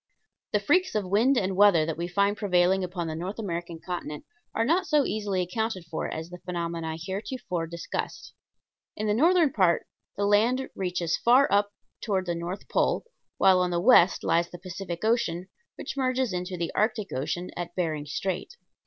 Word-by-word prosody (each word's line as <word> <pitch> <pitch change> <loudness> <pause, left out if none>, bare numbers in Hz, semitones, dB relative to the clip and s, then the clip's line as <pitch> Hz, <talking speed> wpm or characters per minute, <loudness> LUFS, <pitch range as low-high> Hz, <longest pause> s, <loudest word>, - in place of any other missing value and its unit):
The 210 - +2
freaks 360 - +2
of 210 -2 0
wind 225 +8 +3
and 190 -3 0
weather 195 -5 +5
that 160 -1 -2
we 170 +1 -3
find 200 +3 +1
prevailing 190 -2 +2
upon 180 -1 -3
the 160 - -3
North 180 +5 -5
American 170 -5 -4
continent 165 -4 -6 0.3
are 225 - +2
not 350 +7 +2
so 300 -3 +3
easily 200 -4 -1
accounted 195 0 -3
for 165 -1 -3
as 160 +2 -6
the 180 - -8
phenomena 170 -2 -3
heretofore 190 -1 -4
discussed. 170 +1 -5 0.6
In 215 - -2
the 210 - +2
northern 320 - +4
part 185 -5 +3 0.3
the 200 - +1
land 230 +6 +3
reaches 180 -3 -1
far 255 +4 +5
up 205 0 +3 0.3
toward 195 -4 -1
the 175 - -1
north 170 +3 -5
pole, - - +1 0.3
while 190 -1 +5
on 180 0 +1
the 175 -1 0
west 190 -3 +5
lies 170 +1 +2
the 175 - -9
Pacific 180 +1 -6
Ocean, 185 -6 0 0.3
which - - -6
merges 255 -4 0
into 180 0 -3
the 170 -1 -2
Arctic 215 -1 0
Ocean 155 +7 -3
at 175 0 -5
Bering 155 -5 -2
Strait. 190 - -3
185 Hz, 180 wpm, -27 LUFS, 170-215 Hz, 0.6 s, weather